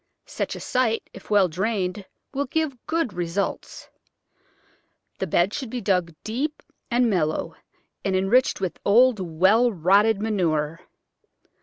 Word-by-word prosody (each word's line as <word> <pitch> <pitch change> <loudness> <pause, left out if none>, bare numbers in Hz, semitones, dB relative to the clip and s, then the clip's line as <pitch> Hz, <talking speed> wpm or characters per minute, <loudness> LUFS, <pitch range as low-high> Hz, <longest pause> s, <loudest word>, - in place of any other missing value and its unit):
Such - - -4
a - - -7
site, 245 -4 0
if 190 - -13
well 205 -3 +4
drained, 190 +2 -2 0.3
will 280 +1 -1
give 310 0 -1
good 325 -9 -1
results. 175 +2 -3 1.3
The 190 - -2
bed 175 +5 +2
should 260 -4 -4
be 250 - -4
dug 180 -6 0
deep 275 +8 -3 0.3
and 245 0 +3
mellow, 165 -4 0 0.5
and 195 -1 0
enriched 200 +8 +2
with 185 -3 -3
old, 235 +2 +5
well 190 +8 +3
rotted 200 +4 +3
manure. 165 -7 0
200 Hz, 130 wpm, -24 LUFS, 180-240 Hz, 1.3 s, old